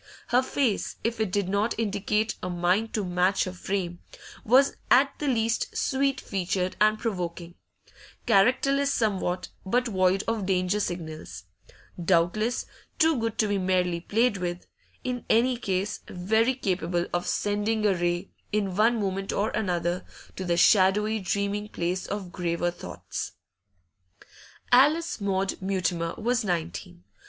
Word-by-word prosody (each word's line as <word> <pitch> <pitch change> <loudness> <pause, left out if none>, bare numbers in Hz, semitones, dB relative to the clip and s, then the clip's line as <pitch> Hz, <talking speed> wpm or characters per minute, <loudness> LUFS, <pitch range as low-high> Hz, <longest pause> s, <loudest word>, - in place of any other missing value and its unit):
Her 245 +1 +4
face, 260 -5 -1
if 230 0 -1
it 215 -4 0
did 200 -1 0
not 200 +4 0
indicate 210 0 0
a 180 - -3
mind 180 +5 +1
to 210 -3 -1
match 180 +2 +2
her 185 - -4
frame, 180 -2 -3 0.4
was 265 +5 +4
at 275 +2 +5
the 295 - -2
least 230 -3 0
sweet 275 0 +1
featured 185 -1 -2
and 215 0 +5
provoking; 175 -6 -4 0.7
characterless 275 +7 +3
somewhat, 190 -7 -1
but 245 +6 +1
void 185 -1 +2
of 225 -4 -1
danger 185 +1 +1
signals; 160 - -5 0.6
doubtless 190 +7 +1 0.3
too 320 0 +4
good 225 -1 -2
to 215 - +2
be 205 -1 0
merely 180 -2 +1
played 220 +5 +1
with; 175 -1 -4 0.4
in 250 -1 -3
any 245 +3 +4
case, 195 -3 -2
very 220 +8 +1
capable 175 -6 -1
of 175 0 -1
sending 210 +1 0
a 205 - +4
ray, 175 +1 -1 0.2
in 200 -3 -1
one 225 +3 +3
moment 195 -1 -2
or 210 +2 0
another, 175 -2 -1 0.3
to 190 - -4
the 175 -1 0
shadowy 210 +4 +4
dreaming 200 +2 -2
place 180 -1 -2
of 195 -3 -5
graver 175 -1 -1
thoughts. 175 - -7 1.4
Alice 295 +3 +4
Maud 195 -1 -1
Mutimer 180 -3 -1
was 245 +2 0
nineteen. 90 - -4
200 Hz, 140 wpm, -27 LUFS, 180-225 Hz, 1.4 s, at